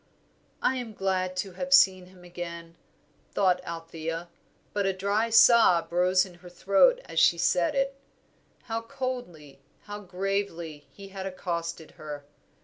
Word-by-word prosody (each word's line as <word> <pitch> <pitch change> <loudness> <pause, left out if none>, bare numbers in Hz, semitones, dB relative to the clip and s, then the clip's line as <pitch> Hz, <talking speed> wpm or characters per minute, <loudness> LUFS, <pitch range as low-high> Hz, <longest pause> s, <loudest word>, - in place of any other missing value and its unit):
"I 260 - +2
am 240 -3 -6
glad 185 -1 -1
to 195 - -10
have 270 +10 -6
seen 185 -6 +4
him 185 -1 -18
again," 170 -1 -8 0.6
thought 185 -3 +2
Althea; 165 0 -6 0.4
but 205 -1 0
a 195 - +1
dry 200 +4 0
sob 225 -7 +6
rose 180 +2 +3
in 185 - -13
her 180 - -11
throat 195 - +3
as - - -2
she 170 - +5
said 170 +3 +1
it. 275 0 +1 0.7
How 225 -1 -3
coldly, 230 - -6 0.2
how 205 0 -7
gravely 180 -6 -4
he 195 +7 -12
had 190 0 -6
accosted 170 -3 -5
her! 145 -2 -7
185 Hz, 140 wpm, -27 LUFS, 170-205 Hz, 0.7 s, sob